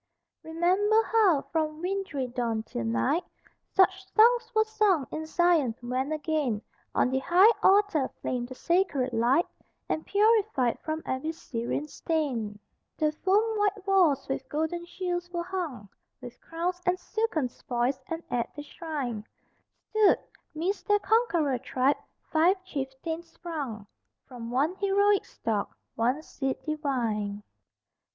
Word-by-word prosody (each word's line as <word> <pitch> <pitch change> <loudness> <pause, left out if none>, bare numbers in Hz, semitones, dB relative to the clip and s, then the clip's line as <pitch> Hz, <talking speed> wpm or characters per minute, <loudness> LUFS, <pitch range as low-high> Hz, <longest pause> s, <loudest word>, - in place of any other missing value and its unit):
Remember 375 +7 +2
how 400 -12 +3
from 310 -1 -1
wintry 365 -6 -2
dawn 235 -3 -2
till 120 - -5
night, 115 - +1 0.5
Such 380 0 +2
songs 470 +2 +5
were 435 - +5
sung 425 -9 +2
in 315 0 -4
Zion, 320 -8 +3
when 255 +4 -2
again 300 -8 -1 0.3
On 250 - +3
the 265 - +1
high 360 +10 +6
altar 390 -9 +4
flamed 245 -1 -2
the 255 - -9
sacred 290 -7 +1
light, 245 +9 +3 0.4
And, 315 - -1
purified 405 - +2
from 315 0 -4
every 260 +5 -2
Syrian 280 -3 -4
stain, 265 -11 -2 0.4
The 305 -1 +2
foam 420 +7 +1
white 410 -1 0
walls 370 -8 +3
with 265 0 -4
golden 320 +4 -2
shields 350 -1 -3
were 345 -1 -3
hung, 340 - -4 0.3
With 245 -2 -11
crowns 355 +2 -3
and 360 0 +3
silken 435 - -1
spoils, 245 +2 -2
and 330 0 -4
at 240 -1 -1
the 295 - -6
shrine, 285 - -4 0.7
Stood, 435 -2 +5 0.4
midst 360 +6 -2
their 415 -1 +5
conqueror 355 - +2
tribe, 265 +2 +1 0.3
five 340 +5 +4
chieftains 315 +1 -5
sprung 285 - -6 0.4
From 240 -3 -8
one 275 +8 +1
heroic 405 0 +3
stock, 210 -3 -3 0.2
one 250 +7 0
seed 270 -4 -3
divine. 230 -10 -2
315 Hz, 130 wpm, -28 LUFS, 255-375 Hz, 0.7 s, high